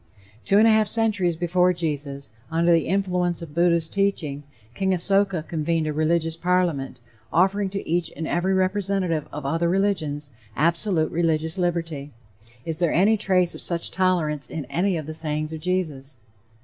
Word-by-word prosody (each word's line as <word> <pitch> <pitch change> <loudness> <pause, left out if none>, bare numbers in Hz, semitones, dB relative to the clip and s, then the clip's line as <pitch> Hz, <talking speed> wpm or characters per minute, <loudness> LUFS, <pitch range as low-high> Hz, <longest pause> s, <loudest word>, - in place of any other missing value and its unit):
Two 200 - +3
and 215 - +6
a - - +6
half 215 -1 +3
centuries 205 -6 +1
before 180 +1 +2
Jesus, 145 -6 -3 0.2
under 165 +1 +2
the 165 -2 +3
influence 180 -2 0
of 155 -3 -10
Buddha's 170 -1 +2
teaching, 175 -8 -1 0.3
King 190 +5 +1
Asoka 195 -1 +1
convened 160 0 -1
a 155 - -2
religious 160 +1 +1
Parliament, 170 -7 0 0.3
offering 195 +3 +2
to 195 +1 -5
each 170 0 0
and 160 - -3
every 185 +2 +1
representative 190 -4 0
of 150 -1 -6
other 165 +4 0
religions, 160 -7 -1 0.2
absolute 170 - +1
religious 160 +1 0
liberty. 165 -5 -2 0.6
Is 160 -1 -3
there 170 -3 +2
any 200 +6 +4
trace 185 -4 +2
of - - -8
such 170 -1 -2
tolerance 160 -7 0
in 155 -4 -5
any 180 +4 +1
of 155 - -5
the 155 - -6
sayings 155 0 -3
of 160 - -5
Jesus? 155 -7 -2
170 Hz, 160 wpm, -24 LUFS, 155-185 Hz, 0.6 s, and